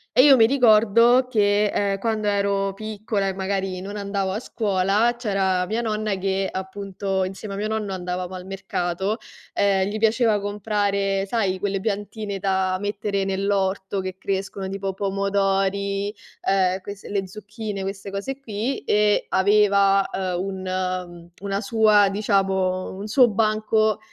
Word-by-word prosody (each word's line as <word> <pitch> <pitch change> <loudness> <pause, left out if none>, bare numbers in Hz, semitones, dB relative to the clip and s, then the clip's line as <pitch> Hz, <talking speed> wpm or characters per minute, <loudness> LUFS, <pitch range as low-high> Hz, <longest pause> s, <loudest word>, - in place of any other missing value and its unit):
E 255 - +7
io 275 -2 +8
mi 225 -2 +6
ricordo 235 0 +5
che, 205 -3 +3
ehm, 200 -1 0
quando 215 0 -1
ero 200 -1 +1
piccola 210 -1 -3
e 195 - -1
magari 190 -1 -2
non 200 +3 -7
andavo 200 -2 -2
a 210 - -2
scuola, 210 +1 +1
c'era 195 -5 0
mia 225 +2 -1
nonna 215 -2 -1
che 190 0 -1
appunto 190 0 -3
insieme 195 +2 -5
a - - -5
mio 210 +1 -2
nonno 215 -3 -2
andavamo 180 0 -4
al 185 -1 -7
mercato, 190 +1 -2 0.4
ehm, 195 -1 +2
gli 210 +2 -3
piaceva 225 -1 +3
comprare 200 -1 -1
sai, 195 -4 0
quelle 200 0 -1
piantine 205 0 -3
da 190 -1 0
mettere 205 -1 -2
nell'orto 195 0 -1
che 185 0 -6
crescono, 195 0 -3
tipo 195 0 -3
pomodori, 195 0 0 0.3
ehm, 190 -1 +1
quest 200 +1 -9
le 195 -2 -2
zucchine, 210 0 -6
queste 195 +1 -5
cose 200 +8 -4
qui, 235 +1 -3
e 210 0 +2
aveva, 200 0 +4
ehm, 185 -2 -2
un 185 -2 -4
una 200 0 -2
sua, 210 -1 +4
diciamo 195 -2 0
un 200 - -6
suo 245 +3 +5
banco 215 0 +1
200 Hz, 145 wpm, -23 LUFS, 190-210 Hz, 0.4 s, io